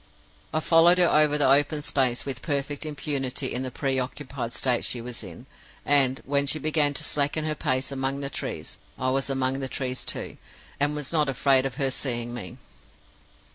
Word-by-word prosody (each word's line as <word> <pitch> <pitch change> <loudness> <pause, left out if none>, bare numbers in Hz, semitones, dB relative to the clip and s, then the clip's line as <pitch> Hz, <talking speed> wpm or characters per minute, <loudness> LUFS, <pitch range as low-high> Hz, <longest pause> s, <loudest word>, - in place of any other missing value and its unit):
I 155 - 0
followed 170 +2 +5
her 180 -1 +5
over 150 -1 +4
the 145 - +4
open 145 +2 +3
space 130 -4 0
with 135 -2 -3
perfect 145 0 -2
impunity 140 -3 -2
in 125 - -2
the 130 - -3
preoccupied 130 -1 -3
state 125 0 +1
she 125 - -1
was 120 0 -5
in; 95 +5 -11 0.4
and, 135 -2 +3
when 140 +1 +2
she 155 - +2
began 150 -1 +1
to - - -2
slacken 145 +2 +1
her 155 - 0
pace 130 -2 -1
among 135 0 -2
the 140 -1 -3
trees, - - -5 0.2
I 130 0 -1
was 135 +1 -1
among 135 0 0
the 135 -1 -3
trees 130 0 -3
too, - - -5 0.4
and 145 +1 +1
was 150 +1 -3
not 150 -3 +2
afraid 135 0 +3
of 130 - -9
her 135 0 0
seeing 120 -3 -2
me. 105 -8 -7
135 Hz, 185 wpm, -25 LUFS, 130-145 Hz, 0.4 s, followed